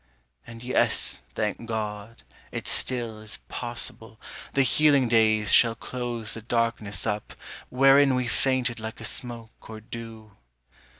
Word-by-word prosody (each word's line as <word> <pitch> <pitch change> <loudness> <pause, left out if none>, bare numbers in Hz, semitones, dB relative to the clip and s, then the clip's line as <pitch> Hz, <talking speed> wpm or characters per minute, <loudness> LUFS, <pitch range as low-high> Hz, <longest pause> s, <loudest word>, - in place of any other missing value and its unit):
And 115 0 -10
yes, 125 - +1
thank 115 - -3
God, 110 0 -5 0.3
it - - -5
still 120 -4 +1
is 110 0 -5
possible 115 -2 -4 0.4
The 140 - +4
healing 140 -1 +4
days 110 -2 +3
shall 115 -1 +5
close 120 -2 -3
the 115 - -3
darkness 115 -2 -1
up 105 0 -3 0.3
Wherein 135 +1 +5
we 125 -1 -1
fainted 125 -2 0
like 110 0 -7
a - - -7
smoke 115 -3 -3
or 110 -1 -8
dew. 110 -1 -10
115 Hz, 130 wpm, -26 LUFS, 110-125 Hz, 0.4 s, shall